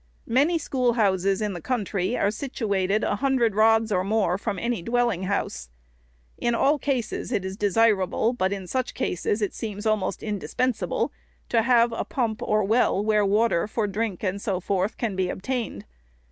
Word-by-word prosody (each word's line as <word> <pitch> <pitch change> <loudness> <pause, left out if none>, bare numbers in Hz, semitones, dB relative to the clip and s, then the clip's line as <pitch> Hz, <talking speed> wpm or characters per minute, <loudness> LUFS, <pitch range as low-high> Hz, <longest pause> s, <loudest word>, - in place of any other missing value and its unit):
Many 285 +8 +2
schoolhouses 215 - +1
in 210 -2 -1
the 175 - -6
country 210 -3 -1
are 200 - +2
situated 210 -5 -1
a 205 - 0
hun 270 +4 +1
dred 235 -4 +2
rods 220 +1 +4
or 185 -2 +2
more 200 -3 +1
from 200 0 -3
any 235 -1 -2
dwelling 230 -2 0
house. 65 - -2 0.7
In 235 0 +1
all 285 +5 +3
cases 255 -4 -2
it 200 -6 -1
is 190 0 -4
desirable, 210 +1 +2
but 190 -6 0
in 195 -2 -4
such 255 +7 -2
cases 205 +4 -1
it 205 - -1
seems 210 -1 -5
almost 215 -3 0
indispen 220 +4 -1
sable, 185 -5 -2 0.4
to 225 - +3
have 235 0 +4
a - - -2
pump 230 -5 -2
or 215 0 +1
well, 210 -1 +2
where 210 -1 +3
water 205 -2 +2
for 215 0 -1
drink 205 -1 -3
and 200 0 -1
so 195 -4 -1
forth 190 +2 -1
can 220 -5 -2
be 185 -1 0
obtained. 225 - -4
215 Hz, 175 wpm, -25 LUFS, 195-235 Hz, 0.7 s, rods